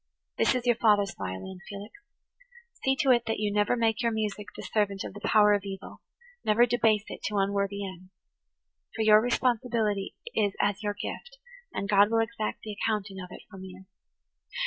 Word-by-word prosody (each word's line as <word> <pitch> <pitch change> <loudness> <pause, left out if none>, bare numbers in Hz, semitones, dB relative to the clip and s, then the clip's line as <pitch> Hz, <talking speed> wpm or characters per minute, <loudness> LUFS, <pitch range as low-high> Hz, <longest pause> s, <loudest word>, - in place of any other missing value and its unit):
"This - - +3
is 250 -1 -2
your 240 -2 +3
father's 205 -5 +3
violin, 95 - -6
Felix. 200 +1 -8 0.9
See 265 0 +3
to 270 - +4
it 235 -2 +3
that 225 - 0
you 210 -1 -1
never 210 +3 +2
make 225 -1 +1
your 235 -1 +1
music 210 -2 -3
the - - -8
servant 200 -3 0
of - - -7
the 205 - -9
power 210 -1 +5
of 205 - +2
evil–never 240 - -2
debase 225 -3 +2
it - - -8
to 210 - -1
unworthy 200 0 0
ends. 185 0 -11 0.9
For 225 - 0
your 215 0 +7
responsibility 235 -4 0 0.2
is 205 -2 +1
as 205 0 +1
your 205 -1 -2
gift, 485 - -7 0.3
and 200 - -3
God 205 0 +5
will 230 - +1
exact 225 -1 -2
the 215 - -5
accounting 205 -3 -1
of 180 - -7
it - - -10
from 190 -2 -10
you. 190 0 -11
210 Hz, 180 wpm, -28 LUFS, 200-225 Hz, 0.9 s, your